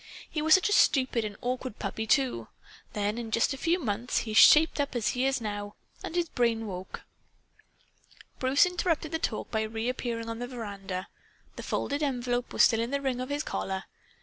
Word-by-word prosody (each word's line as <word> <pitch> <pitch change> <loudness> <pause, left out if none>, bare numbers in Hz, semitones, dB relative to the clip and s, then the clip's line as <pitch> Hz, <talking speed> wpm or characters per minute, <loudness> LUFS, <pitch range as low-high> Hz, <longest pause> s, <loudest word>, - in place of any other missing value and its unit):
He 305 - -3
was 315 0 +6
such 375 +3 +2
a - - -1
stupid 255 - +3
and 210 -1 -5
awkward 250 -1 -3
puppy, 220 0 -4
too! 265 +1 +1 0.5
Then, 210 +2 -1
in 230 -2 -5
just 230 +5 +1
a - - -4
few 335 +5 +1
months, 235 - -1
he 220 - -5
shaped 310 +8 +7
up, 280 -2 -1
as 235 -3 +1
he 255 +2 0
is 270 0 0
now. 205 -2 -5 0.3
And 325 - -5
his 345 -1 +1
brain 230 -5 0
woke." 185 -2 -7 1.4
Bruce 265 +4 +4
interrupted 340 -3 -1
the 320 - -1
talk 225 -9 -3
by 220 - 0
reappearing 230 +1 -3
on 230 0 -5
the 245 - -4
veranda. 200 -6 -6 0.5
The - - -7
folded 285 +1 -2
envelope 245 -3 -1
was - - +4
still 225 - +4
in 230 +1 -1
the 280 +1 -1
ring 260 -3 -2
on 255 - -5
his 290 +1 -1
collar. 190 0 -3
245 Hz, 195 wpm, -28 LUFS, 220-280 Hz, 1.4 s, shaped